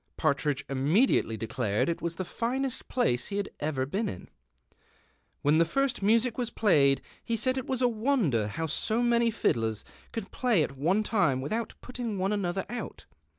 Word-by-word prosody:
Partridge 145 0 0
inuuediatcly 140 - +2
declared 110 -1 -1
it 170 - -2
was 170 0 -3
the 185 - -4
finest 255 +6 -2
place 125 - +1
he 200 - -3
had 205 - -2
ever 145 -3 -1
been 200 +11 -1
in. 90 - -8 1.1
When 150 +3 +4
the - - +6
first 270 +10 0
music 230 +4 +2
was 240 -2 -1
played 140 -13 +3 0.2
he 230 - -1
said 255 +3 +1
it 260 - -4
was 260 -1 0
a - - +6
wonder 215 - +1
how 160 +10 -3
so 220 +9 +1
numy 235 -1 +3
fiddlers 115 - 0 0.3
could 225 -4 -5
j^lay 235 -11 +2
at 140 - -4
one 175 +10 +1
time 195 - +2
without 215 - -3
putting 245 -4 -4
one 190 +2 0
another 195 -2 -1
out. 240 -4 -6
195 Hz, 175 wpm, -29 LUFS, 140-235 Hz, 1.1 s, the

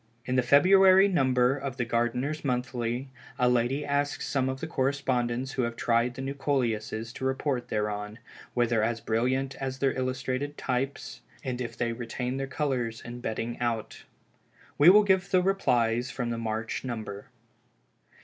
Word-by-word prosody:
In 130 - -1
the 130 - +4
February 190 +9 +6
number 130 -7 +2
of 135 -2 -5
the 120 - -1
Gardeners 125 +6 -1
Monthly, 125 -1 -2 0.3
a 125 -2 +3
lady 125 +4 +1
asks 145 0 -1
some 130 -2 0
of 130 0 -4
the 160 - -4
correspondents 130 -4 -1
who 130 - -1
have 115 -1 -2
tried 120 +1 +1
the 135 - -5
new 135 +1 -3
Coleuses, 115 -5 -2
to - - -8
report 130 -1 -1
thereon, 105 0 -3 0.4
whether 120 -2 +2
as 115 +1 0
brilliant 130 +5 0
as 130 -1 -4
their 135 0 +1
illustrated 130 +2 -2
types, 135 +2 -3 0.2
and 125 -2 -3
if 120 - -5
they 120 -1 -1
retain 125 +2 -4
their 135 0 -3
colors 130 -6 -2
in 120 0 -7
bedding 115 +1 -3
out. 115 -2 -3 0.7
We 150 +4 +9
will 210 +3 +8
give 190 -2 +2
the 185 -2 +3
replies 125 -11 +1
from 125 -2 -3
the 115 - -3
March 115 0 -3
number. 110 -5 -6
125 Hz, 160 wpm, -28 LUFS, 120-135 Hz, 0.7 s, We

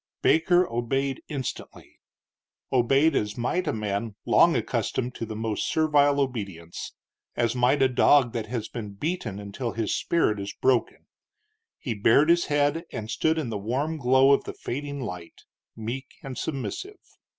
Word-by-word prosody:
Baker 175 +2 +4
obeyed 135 +3 -1
instantly; 140 -5 -6 0.7
obeyed 135 +5 +3
as 105 -3 -1
might 170 +9 -1
a - - +2
man 105 0 -3
long - - +5
accustomed 125 0 -1
to 115 - -5
the 110 - -6
most 110 -1 -2
servile 145 -2 +3
obedience; 100 -11 -4 0.4
as 120 -1 +1
might 130 +3 +3
a - - +6
dog 125 0 +4
that 115 -2 -3
has 115 -1 -3
been 105 -4 -7
beaten 135 - -3
until 105 +4 -5
his 110 -2 -1
spirit 135 -11 +1
is 100 0 -5
broken. 130 -2 +1 0.7
He 125 -7 -3
bared 115 +9 +4
his 170 0 +3
head, 145 +3 +1
and 110 0 -5
stood 160 0 +1
in 150 -7 -2
the 105 -2 -3
warm 135 +10 -2
glow 130 0 +4
of 140 - +3
the - - -5
fading 140 +2 -5
light, 90 -8 -8 0.3
meek 120 +4 -6
and 135 -2 -6
submissive. 265 - -4
125 Hz, 155 wpm, -26 LUFS, 110-145 Hz, 0.7 s, a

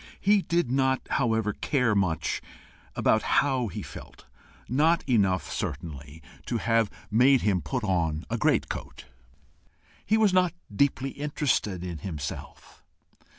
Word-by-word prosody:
He 205 0 +4
did 170 -8 0
not, 130 0 +1
however, 115 -5 +1 0.4
much 90 -6 0 0.6
care - - +3
how 130 -4 +1
he 95 - -6
felt - - -11 0.4
not 155 +7 +2
enough, 100 -7 +1
certainly, 75 +1 -6 0.2
to 120 - -1
have 115 -1 +2 0.2
made 125 +4 +5
him 95 -4 +1
put 130 -3 -3
on 85 -6 0
a - - -2
great - - +2
coat: - - -7 1.0
he 220 - +2
was 215 -4 +3
not 180 -2 +3 0.2
deeply 135 +1 +1
interested 140 - -1
in 85 -3 -5
himself. 75 -5 -7
115 Hz, 125 wpm, -27 LUFS, 90-140 Hz, 1.0 s, made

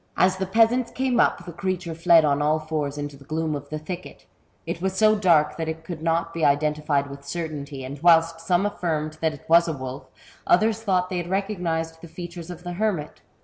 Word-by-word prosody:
As 185 +1 +3
the 190 0 -2
peasants 230 +4 +3
came 255 -2 0
up, - - +2
the 175 - -7
creature 180 -1 -3
fled 165 -1 +5
on 145 -1 +2
all 150 +1 +2
fours 155 -2 -3
into 145 -1 -5
the 140 - -15
gloom 155 +2 -2
of 145 0 -7
the 155 - -3
thicket; 175 +4 -8 0.4
it 170 +1 -4
was 190 0 0
so 215 +1 +5
dark 170 -7 +3
that 160 -1 -2
it 160 0 -5
could 165 -1 -7
not 165 +1 0
be 165 - -3
identified 150 0 +2
with 140 0 -10
certainty, 145 -3 -5
and 140 +2 -8
whilst 165 -1 +5
some 175 +3 +1
affirmed 155 -6 -2
that 160 -1 +1
it 145 - -17
was 170 +1 +6
a 165 - -1
wolf, 130 -1 -7 0.4
others 220 +4 +3
thought 185 -4 0
they 180 - -1
had 175 0 -4
recognized 175 -5 -2
the 170 - -9
features 175 0 -8
of 175 0 -8
the 175 0 -5
hermit. 185 -6 -2
165 Hz, 215 wpm, -24 LUFS, 150-180 Hz, 0.4 s, was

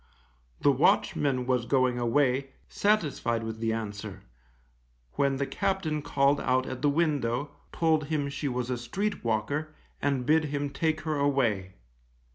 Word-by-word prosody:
The - - +5
watchman 130 -3 +2
was 125 -2 0
going 130 -2 +2
away, 135 +2 +1
satisfied 150 - 0
with 110 0 -5
the 115 0 0
answer, 105 -2 -5 0.9
when 140 -1 +1
the 140 +1 -1
captain 190 -4 -1
called 140 0 +2
out 130 +1 +1
at 130 -1 -6
the 145 - +3
window, 145 -4 0 0.2
told 160 -2 +2
him 145 -1 -1
she 140 +1 -3
was 125 -1 -2
a 125 - -2
street 200 - -3
walker, 140 +8 -1 0.3
and 135 -3 0
bid 155 +3 +3
him 145 -1 -2
take 155 +2 0
her 155 -1 -2
away. 120 -10 +1
140 Hz, 145 wpm, -28 LUFS, 120-150 Hz, 0.9 s, The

